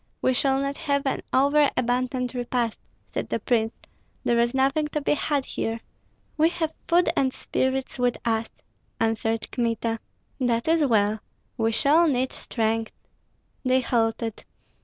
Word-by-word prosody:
"We 260 - +2
shall 270 +1 +2
not 275 0 -2
have 280 -1 0
an 270 - 0
over 285 +2 +4
abundant 250 +1 0
repast," 245 -2 -1 0.3
said - - -4
the - - -1
prince; 225 -3 +1 0.5
"there 235 0 +2
is 235 +2 +2
nothing 275 +3 +2
to 300 - -2
be 285 - +1
had 290 -2 0
here." 225 +1 -3 0.6
"We 315 +2 +5
have 325 -2 -2
food 350 +1 +4
and 265 -1 +2
spirits 260 0 -2
with 245 -1 +2
us," 225 -1 0 0.5
answered 225 0 0
Kmita. 230 -1 -1 0.4
"That 235 -1 +1
is 325 -1 +4
well! 215 -3 +2 0.4
We 225 -2 +1
shall 305 +8 +4
need 260 -3 +1
strength." 225 -1 -1 0.7
They 260 0 +3
halted. 225 -2 -1
250 Hz, 145 wpm, -25 LUFS, 230-280 Hz, 0.7 s, We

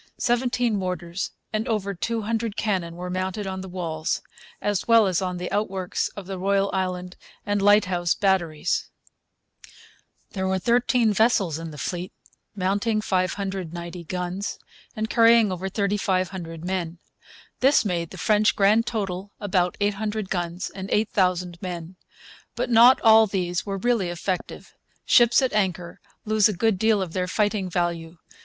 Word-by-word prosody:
Seventeen 245 -2 +1
mortars 180 -1 -3 0.2
and 215 +1 -1
over 200 -3 -1
two 225 +4 -2
hundred 225 0 -2
cannon 185 -6 -1
were 180 +1 -6
mounted 185 +2 -3
on 190 -1 -4
the 190 - -8
walls, 165 -3 -3 0.4
as 205 -2 -1
well 230 -2 +6
as 185 -1 0
on 180 -1 -2
the 180 0 -5
outworks 195 -3 -1
at 200 - -6
the 190 0 -6
Royal, 195 +1 +1
Island, 180 -1 -3 0.3
and 205 -1 0
Lighthouse 190 -4 +3
Batteries. 180 -5 0 1.4
There 190 -2 -2
were 190 0 +1
thirteen 235 +2 +2
vessels 200 -7 +2
in 165 0 -6
the 150 - -10
fleet, 180 +4 -4 0.4
mounting 200 +3 0
590 185 -3 -3
guns, 180 +3 -4 0.4
and 220 -1 -2
carrying 230 -2 +5
over 185 +1 -3
3,500 185 -4 -2
men. 180 -2 -3 0.6
This 270 -2 +4
made 170 -4 -1
the - - -10
French 215 0 +2
grand 215 +4 +3
total 200 -4 -3
about 185 -3 0
800 210 0 -2
guns 175 0 -3
and 190 0 -7
8,000 180 -4 0
men. 175 -1 -6 0.6
But - - -2
not 240 +3 +7
all 220 -1 +7
these 180 -2 -2
were 195 0 -2
really 220 -3 +1
effective. 175 +2 -4 0.3
Ships 240 +1 +5
at 260 - 0
anchor 180 -4 -1 0.2
lose 215 -1 +4
a - - -1
good 220 -2 +1
deal 220 -2 +3
of 170 -3 -8
their 180 -1 -1
fighting 205 -1 0
value. 170 -2 -2
190 Hz, 150 wpm, -24 LUFS, 180-215 Hz, 1.4 s, not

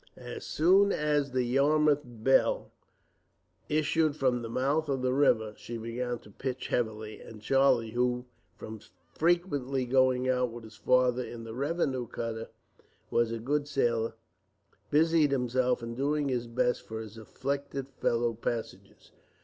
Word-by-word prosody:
As - - -7
soon 190 +5 +4
as 150 -2 +1
the 130 -1 0
Yarmouth 145 +4 +3
Belle 120 +2 +1 1.0
issued 155 0 +2
from 130 -4 +1
the 115 - -6
mouth 140 +6 0
of 135 -2 -1
the 130 0 +2
river, 110 -6 +3
she 120 - -7
began 120 +2 -3
to 105 - -16
pitch 130 +4 -4
heavily; 110 -2 -2
and 110 - -11
Charlie, 125 -1 +3
who 125 +1 0 0.3
from 110 0 -8 0.3
frequently 145 - +1
going 130 0 +3
out 125 -1 +1
with 120 0 -9
his 110 -1 -12
father 125 0 +3
in 120 -1 -8
the 115 0 -7
revenue 135 -2 -1
cutter, 115 0 -5 0.6
was 120 -1 +2
a 115 - -2
good 145 +5 -1
sailor, 115 -5 0 0.7
busied 160 0 +4
himself 125 -2 +1
in 115 0 -5
doing 145 +3 0
his 120 -2 -1
best 120 +1 0
for 110 0 -7
his 110 -1 -8
afflicted 135 +5 -4
fellow 120 0 +1
passengers. 110 -4 -6
125 Hz, 145 wpm, -29 LUFS, 115-140 Hz, 1.0 s, soon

